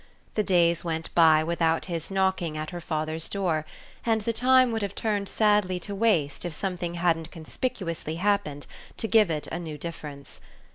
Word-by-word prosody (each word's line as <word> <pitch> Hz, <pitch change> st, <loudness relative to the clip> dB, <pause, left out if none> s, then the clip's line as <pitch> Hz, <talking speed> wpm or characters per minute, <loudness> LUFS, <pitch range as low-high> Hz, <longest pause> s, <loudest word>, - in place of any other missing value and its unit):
The 215 Hz, -, +1 dB
days 170 Hz, -4 st, +3 dB
went 165 Hz, -1 st, -3 dB
by 160 Hz, -2 st, +6 dB
without 165 Hz, 0 st, +1 dB
his 170 Hz, -3 st, -4 dB
knocking 190 Hz, -4 st, 0 dB
at 155 Hz, 0 st, -4 dB
her 175 Hz, -1 st, -6 dB
father's 155 Hz, 0 st, -2 dB
door, 165 Hz, -6 st, -1 dB, 0.4 s
and 225 Hz, -2 st, +1 dB
the 230 Hz, +2 st, -1 dB
time 255 Hz, +1 st, +4 dB
would 225 Hz, -1 st, -1 dB
have 200 Hz, -1 st, -3 dB
turned 205 Hz, -3 st, -1 dB
sadly 205 Hz, -4 st, +2 dB
to 200 Hz, -, -5 dB
waste 195 Hz, -9 st, +1 dB
if 175 Hz, -3 st, -3 dB
something 180 Hz, -2 st, -3 dB
hadn't 170 Hz, -2 st, +1 dB
conspicuously 170 Hz, -2 st, -4 dB
happened 175 Hz, -6 st, 0 dB, 0.3 s
to 225 Hz, -, -1 dB
give 215 Hz, -4 st, +5 dB
it 155 Hz, -2 st, -2 dB
a 170 Hz, -, -3 dB
new 160 Hz, -3 st, -6 dB
difference. 145 Hz, -3 st, -8 dB
175 Hz, 175 wpm, -26 LUFS, 160-200 Hz, 0.4 s, by